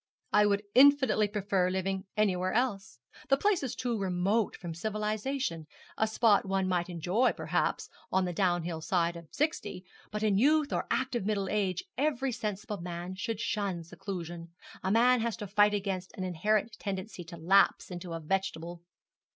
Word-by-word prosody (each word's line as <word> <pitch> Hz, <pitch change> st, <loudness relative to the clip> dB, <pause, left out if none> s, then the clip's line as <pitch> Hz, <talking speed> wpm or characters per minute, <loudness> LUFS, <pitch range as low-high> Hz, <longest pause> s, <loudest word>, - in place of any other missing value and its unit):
'I 210 Hz, 0 st, +6 dB
would 200 Hz, 0 st, +1 dB
infinitely 265 Hz, -5 st, +6 dB
prefer 200 Hz, -3 st, 0 dB
living 190 Hz, +1 st, -2 dB
anywhere 185 Hz, -3 st, +1 dB
else. 220 Hz, -, -1 dB, 0.3 s
The 275 Hz, -, +5 dB
place 405 Hz, +2 st, +2 dB
is 265 Hz, -4 st, -3 dB
too 240 Hz, -3 st, -2 dB
remote 195 Hz, +3 st, +1 dB
from 170 Hz, -3 st, -6 dB
civilization. 215 Hz, -, -2 dB, 0.3 s
A 220 Hz, -, +1 dB
spot 220 Hz, -1 st, +4 dB
one 195 Hz, -1 st, 0 dB
might 180 Hz, -1 st, 0 dB
enjoy, 180 Hz, +8 st, +1 dB
perhaps, -, -, -1 dB, 0.2 s
on 190 Hz, 0 st, +2 dB
the 180 Hz, -, -3 dB
downhill 175 Hz, -3 st, 0 dB
side 170 Hz, 0 st, +1 dB
of 170 Hz, -1 st, -10 dB
sixty; 290 Hz, -, -2 dB, 0.2 s
but 210 Hz, 0 st, -4 dB
in 200 Hz, -2 st, +3 dB
youth 300 Hz, +3 st, +3 dB
or -, -, -1 dB
active 255 Hz, -4 st, 0 dB
middle 200 Hz, -2 st, -1 dB
age 200 Hz, -, 0 dB, 0.2 s
every 270 Hz, -3 st, +1 dB
sensible 210 Hz, -3 st, -4 dB
man 175 Hz, +1 st, -5 dB
should 210 Hz, +3 st, -3 dB
shun 200 Hz, -6 st, -2 dB
seclusion. 175 Hz, -1 st, -7 dB, 0.3 s
A 190 Hz, -, 0 dB
man 240 Hz, +3 st, +4 dB
has 230 Hz, -1 st, -1 dB
to 210 Hz, -, -5 dB
fight 205 Hz, +1 st, +4 dB
against 190 Hz, -2 st, -3 dB
an 185 Hz, -, -3 dB
inherent 210 Hz, +5 st, 0 dB
tendency 190 Hz, -2 st, -5 dB
to 170 Hz, +1 st, -9 dB
lapse 190 Hz, +4 st, +3 dB
into 175 Hz, -1 st, -6 dB
a 165 Hz, -, -3 dB
vegetable.' 175 Hz, 0 st, -3 dB
195 Hz, 165 wpm, -30 LUFS, 180-220 Hz, 0.3 s, I